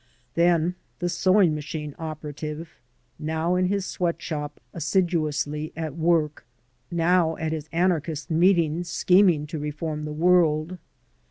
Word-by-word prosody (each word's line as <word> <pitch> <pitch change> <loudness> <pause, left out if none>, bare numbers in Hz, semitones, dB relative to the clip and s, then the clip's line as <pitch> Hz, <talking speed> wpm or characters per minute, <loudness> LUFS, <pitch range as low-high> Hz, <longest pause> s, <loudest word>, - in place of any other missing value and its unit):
Then 170 +1 +3 0.2
the 175 - -1
sewing 185 -2 +3
machine 150 0 -5
operative, 155 0 -6 0.5
now 160 +3 -1
in 180 0 +2
his 200 0 -1
sweat 170 -4 -1
shop 150 -3 -5
assiduously 155 -3 0
at 160 -3 -4
work, 160 -2 +1 0.5
now 170 -1 +2
at 160 -1 -2
his 155 -1 -4
anarchist 165 -2 0
meetings 170 -1 +3
scheming 180 -4 +4
to 155 0 -5
reform 150 +1 -4
the 150 - -4
world. 165 +1 +2
160 Hz, 120 wpm, -25 LUFS, 150-175 Hz, 0.5 s, scheming